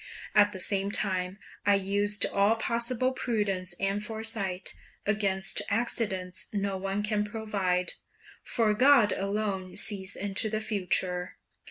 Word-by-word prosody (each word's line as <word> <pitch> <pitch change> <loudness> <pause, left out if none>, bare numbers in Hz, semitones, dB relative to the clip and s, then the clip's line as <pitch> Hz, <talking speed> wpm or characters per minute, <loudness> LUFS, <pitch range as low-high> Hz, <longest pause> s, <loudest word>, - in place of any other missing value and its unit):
At 205 -1 +5
the 190 - -7
same 195 +1 +1
time 185 -2 0 0.3
I 205 0 +4
used 205 +1 +1
all 200 +3 +2
possible 235 +3 0
prudence 200 -8 -2
and 195 +2 0
foresight; 220 -4 -2 0.3
against 200 -2 +1
accidents 200 -5 0
no 200 -1 -1
one 195 +2 -2
can 210 0 0
provide, 205 -4 -1 0.5
for 220 -2 +1
God 250 -2 +5
alone 195 -2 -2
sees 190 -3 +1
into 205 +2 +1
the 215 0 -1
future. 185 -4 -1
205 Hz, 125 wpm, -28 LUFS, 190-215 Hz, 0.5 s, At